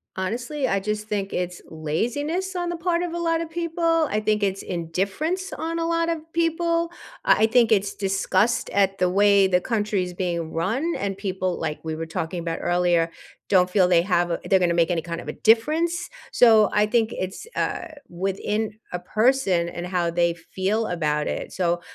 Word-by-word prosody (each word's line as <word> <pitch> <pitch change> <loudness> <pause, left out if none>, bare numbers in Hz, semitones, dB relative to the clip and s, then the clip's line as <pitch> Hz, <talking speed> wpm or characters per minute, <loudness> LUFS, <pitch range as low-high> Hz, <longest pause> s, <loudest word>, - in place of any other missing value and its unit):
Honestly? 245 +9 -2
I 195 - +1
just 210 +1 -3
think 200 -2 -2
it's 180 0 -3
laziness 285 - -2
on 350 -1 -1
the 345 - -3
part 340 0 0
of 350 -1 -3
a - - -2
lot 330 -1 +1
of 335 - -5
people. 330 -1 +1
I 210 - +1
think 215 -1 0
it's 195 -1 0
indifference 195 - -2
on 330 +1 -3
a 330 - 0
lot 335 0 +1
of 335 -1 -1
people. 335 0 +1 0.3
I - - +4
I - - +6
think 235 0 +3
it's 200 -1 +1
disgust 195 +3 +1
at 195 -1 +1
the 180 - +3
way 200 +1 +5
the 180 -1 +3
country 210 0 -1
is 180 0 -6
being 170 -3 -3
run 230 - -1
and 195 -1 -3
people, 190 -2 -2
like, 155 -2 -4
we 160 -1 -3
were 165 +1 -4
talking 165 +2 -4
about 165 -1 -3
earlier, 175 -1 +2 0.4
don't 185 -2 +4
feel 185 -1 +4
they 175 -2 +4
have, 175 -2 +1
uh 170 - 0
they're 190 - +4
gonna 175 -2 +2
make 170 +1 +3
any 170 -2 0
kind 170 +1 -5
of - - -10
a - - -3
difference. 305 +10 +3 0.4
So, 220 -4 +6
I 210 - +3
think 220 0 +1
it's, 190 - -5
uh, - - -2 0.2
within 195 +4 -2 0.2
a 180 - -2
person 215 -3 +2
and 175 +1 -5
how 175 -2 0
they 170 0 +1
feel 190 +6 -2
about 150 -4 -1
it. - - -4
So, 175 -1 0
195 Hz, 195 wpm, -24 LUFS, 175-270 Hz, 0.4 s, I